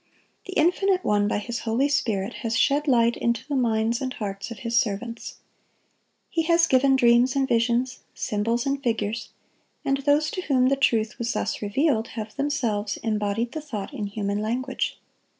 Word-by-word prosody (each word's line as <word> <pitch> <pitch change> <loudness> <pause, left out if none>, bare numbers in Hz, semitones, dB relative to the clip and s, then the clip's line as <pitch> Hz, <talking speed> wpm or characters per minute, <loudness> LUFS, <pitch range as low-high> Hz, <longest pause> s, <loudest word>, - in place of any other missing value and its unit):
The 380 - -6
Infinite 365 +3 +2
One 205 -1 +2
by - - 0
His 235 +3 -4
Holy 235 +5 +1
Spirit 225 -7 0
has 230 -1 -1
shed 290 +2 +2
light 235 -3 +4
into 235 -1 -1
the 290 - -2
minds 230 -1 +1
and 260 -1 -2
hearts 195 -3 -5
of 230 - -7
His 230 0 -1
servants. 230 +1 -1 0.9
He 330 - 0
has 335 +1 +4
given 270 -2 +4
dreams 245 +1 +4
and 270 -1 +2
visions, 240 +2 +1 0.2
symbols 230 +4 -1
and 275 0 -1
figures; 225 -3 -2 0.6
and 275 0 +2
those 290 +2 +2
to 370 - -3
whom 260 -6 +2
the 275 - +3
truth 225 -5 +1
was 235 +1 -1
thus - - -2
revealed, 225 +2 +1
have 215 0 -5
themselves 230 -8 -1
embodied 215 +1 -1
the 315 - -5
thought 220 -10 -6
in 205 - -3
human 200 0 -2
language. 250 +5 -2
235 Hz, 170 wpm, -25 LUFS, 220-275 Hz, 0.9 s, light